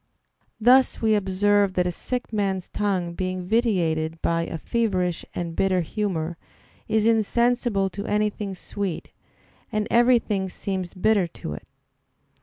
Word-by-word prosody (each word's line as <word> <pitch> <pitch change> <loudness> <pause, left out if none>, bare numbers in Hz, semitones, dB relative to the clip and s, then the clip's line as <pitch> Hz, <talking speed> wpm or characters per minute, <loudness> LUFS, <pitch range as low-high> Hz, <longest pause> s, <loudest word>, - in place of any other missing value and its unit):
Thus 255 +4 +5
we 220 -1 +2
observe 205 0 +2
that 180 - +2
a 180 - 0
sick 245 +6 -4
man's 195 -3 -1
tongue 190 -4 -1
being 185 0 -3
vitiated 170 -8 +1
by 165 0 +1
a - - -4
feverish 185 -3 -1
and 170 -2 -4
bitter 185 -2 +2
humor, 170 -2 -2 0.5
is 220 -1 +2
insensible 230 -2 +2
to 200 +3 -6
anything 210 -1 -1
sweet, 195 -1 -5 0.6
and 215 -1 -1
everything 235 -5 +3
seems 185 -1 -4
bitter 200 -1 +2 0.2
to 75 - -3
it. 75 - -10
195 Hz, 130 wpm, -24 LUFS, 180-215 Hz, 0.6 s, Thus